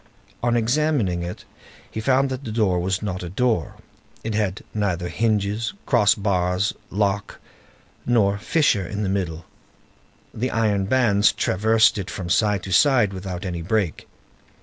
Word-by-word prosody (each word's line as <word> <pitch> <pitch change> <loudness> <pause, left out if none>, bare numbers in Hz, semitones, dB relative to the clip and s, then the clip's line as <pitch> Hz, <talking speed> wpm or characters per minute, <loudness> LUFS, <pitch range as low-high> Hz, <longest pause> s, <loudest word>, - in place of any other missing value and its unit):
On 120 0 +2
examining 120 - +1
it 85 +1 -6 0.5
he - - -5
found 135 +3 +2
that 130 +1 -4
the 115 - -5
door 105 -5 +1
was 95 +3 -1
not 95 -3 -3
a 90 - -5
door; 110 -2 0 0.5
it 110 - -3
had 105 -2 -1
neither 90 -4 -1
hinges, 105 - 0
cross 110 -7 +4
bars, 95 -1 0 0.2
lock, 100 0 -1 0.6
nor 100 -4 +2
fissure 105 - +1
in 105 +3 -3
the 95 - -1
middle; 85 -4 -3 0.9
the 125 +4 -2
iron 105 -5 +1
bands 110 -3 +3
traversed 110 +3 +2
it 95 - -5
from 90 -2 -5
side 105 -2 +2
to 95 - -6
side 120 -2 +4
without 95 -1 -6
any 85 -2 -4
break. 95 -1 -1
105 Hz, 150 wpm, -23 LUFS, 95-115 Hz, 0.9 s, cross